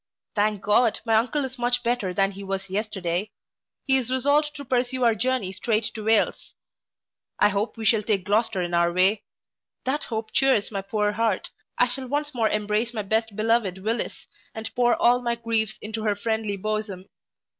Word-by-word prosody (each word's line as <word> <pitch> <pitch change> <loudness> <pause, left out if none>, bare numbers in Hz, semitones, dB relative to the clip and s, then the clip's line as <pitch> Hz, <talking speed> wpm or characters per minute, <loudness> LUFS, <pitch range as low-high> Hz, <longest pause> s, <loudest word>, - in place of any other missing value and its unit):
Thank 210 -1 0
God, 215 +2 +3
my 225 - +1
uncle 255 +6 +2
is 260 -1 -8
much 245 0 +1
better 235 -6 0
than 195 +2 +1
he 200 0 -9
was 195 0 -4
yesterday. 195 -2 -2 0.5
He 265 -1 +4
is 250 -2 -2
resolved 285 +4 +2
to 285 -1 -8
pursue 255 0 0
our 230 -1 +5
journey 245 -3 -1
strait 215 +2 -1
to 220 - -6
Wales. 220 -1 +1 0.8
I - - +5
hope 210 +4 -2
we 225 - -5
shall 220 -1 +4
take 205 -3 0
Gloucester 205 -2 +1
in 175 0 -4
our 170 0 +3
way 190 +4 +3 0.6
that 275 +3 -1
hope 220 -1 -4
chears 265 -7 +3
my 200 -2 -2
poor 210 +1 0
heart 220 -2 0 0.3
I 245 - +4
shall 260 +1 -3
once 290 +2 -2
more 225 -3 +1
embrace 210 +3 -1
my 215 - -2
best 220 +1 0
beloved 215 -3 +1
Willis, 225 +3 -2 0.3
and 225 0 -6
pour 240 -1 +3
all 245 +1 +3
my 235 -1 0
griefs 225 -2 -1
into 220 +1 -4
her 210 -1 +1
friendly 220 -1 -2
bosom. 215 -2 -3
220 Hz, 185 wpm, -25 LUFS, 205-245 Hz, 0.8 s, our